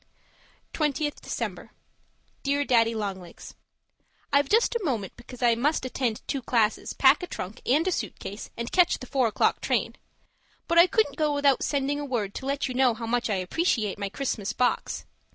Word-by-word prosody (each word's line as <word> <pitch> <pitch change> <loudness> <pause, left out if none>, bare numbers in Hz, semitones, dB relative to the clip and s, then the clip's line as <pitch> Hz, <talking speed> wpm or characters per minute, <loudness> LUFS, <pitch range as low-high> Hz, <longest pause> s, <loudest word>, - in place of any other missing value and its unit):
20th 300 -1 -1
December - - -5 0.7
Dear 285 +1 0
Daddy 230 -3 +3
Long 200 -3 -3
Legs, 175 -2 -12 0.8
I've 280 0 +3
just 455 +3 +3
a 465 - -1
moment, 230 - -2
because 245 +1 -10
I 240 -1 +5
must 260 +4 0
attend 245 -3 -2
two 275 - -2
classes, 225 -3 0
pack - - +5
a 360 - -4
trunk 190 - -7
and 300 +8 +3
a - - +2
suit 220 - -3
case, 200 +2 -7
and 235 0 -4
catch 360 -2 +4
the 255 - -9
four 255 -1 +1
o'clock 215 - +1
train - - 0 0.7
but 335 0 +4
I 345 - +8
couldn't 440 +3 +1
go 305 -2 +1
without 285 -2 +3
sending 285 0 0
a 290 - -4
word 225 -7 -2
to 265 - -6
let 280 0 -1
you 255 - -4
know 250 -2 +3
how 230 0 -6
much 240 +1 0
I 205 - +1
appreciate 210 - 0
my 200 -1 -2
Christmas 215 -4 -3
box. 250 -1 -1
255 Hz, 190 wpm, -26 LUFS, 225-290 Hz, 0.8 s, I